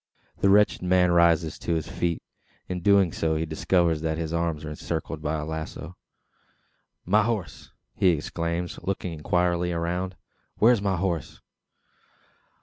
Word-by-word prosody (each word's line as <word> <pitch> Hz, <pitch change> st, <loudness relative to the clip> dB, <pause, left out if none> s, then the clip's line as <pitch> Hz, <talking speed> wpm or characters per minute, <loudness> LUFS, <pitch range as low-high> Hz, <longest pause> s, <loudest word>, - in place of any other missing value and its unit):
The 100 Hz, -, +3 dB
wretched 105 Hz, +1 st, +4 dB
man 90 Hz, -1 st, +3 dB
rises 85 Hz, -2 st, +3 dB
to 85 Hz, -, -1 dB
his 80 Hz, -, -2 dB
feet. 85 Hz, -1 st, -2 dB, 0.4 s
In 90 Hz, -1 st, -3 dB
so -, -, -13 dB
doing, 85 Hz, -5 st, +3 dB
he 80 Hz, -, -1 dB
discovers 85 Hz, -1 st, +1 dB
that 80 Hz, -1 st, -1 dB
his 80 Hz, -1 st, -3 dB
arms 85 Hz, -2 st, -1 dB
are 75 Hz, -, -5 dB
encircled 80 Hz, 0 st, -4 dB
by 75 Hz, +1 st, -1 dB
a 75 Hz, -, -4 dB
lazo. 80 Hz, +2 st, -6 dB, 1.1 s
"My 105 Hz, +4 st, +4 dB
horse?" 110 Hz, -3 st, -3 dB, 0.2 s
he 95 Hz, -, +2 dB
exclaims, 85 Hz, +1 st, -1 dB
looking 90 Hz, -2 st, -3 dB
inquiringly 90 Hz, +2 st, 0 dB
around. 90 Hz, +2 st, -2 dB, 0.4 s
"Where 115 Hz, +3 st, +6 dB
is 110 Hz, -, 0 dB
my 100 Hz, -2 st, +1 dB
horse?" 85 Hz, -3 st, -2 dB
85 Hz, 145 wpm, -26 LUFS, 80-90 Hz, 1.1 s, Where